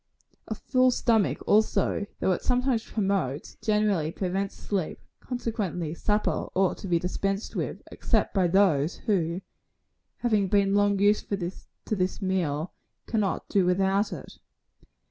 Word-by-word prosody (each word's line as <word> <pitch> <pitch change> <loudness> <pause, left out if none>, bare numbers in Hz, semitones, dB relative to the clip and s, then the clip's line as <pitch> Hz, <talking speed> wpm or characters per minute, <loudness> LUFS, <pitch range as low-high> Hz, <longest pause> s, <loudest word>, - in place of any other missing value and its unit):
"A - - -3
full 255 -1 +3
stomach, 230 -4 +1
also, 210 -1 +2
though - - +2
it 180 - 0
sometimes 250 -2 +1
promotes, 190 - -1
generally 210 -7 +1
prevents 195 +2 -2
sleep; 190 -6 -3 0.2
consequently, 210 -10 -3
supper 210 +4 0
ought 190 -1 +2
to 200 - -6
be 175 -2 +3
dispensed 195 +4 -2
with, - - -3
except - - 0
by 190 -3 +3
those 170 -5 +3
who, 180 -5 0 0.8
having 215 -5 +1
been 200 0 +3
long 205 0 +3
used 205 +2 +2
to 195 +2 -4
this 185 -1 -1
meal, 180 -5 -1 0.3
cannot 215 -4 -1
do 195 - +2
without 195 +3 +2
it. - - -9
195 Hz, 130 wpm, -27 LUFS, 180-210 Hz, 0.8 s, full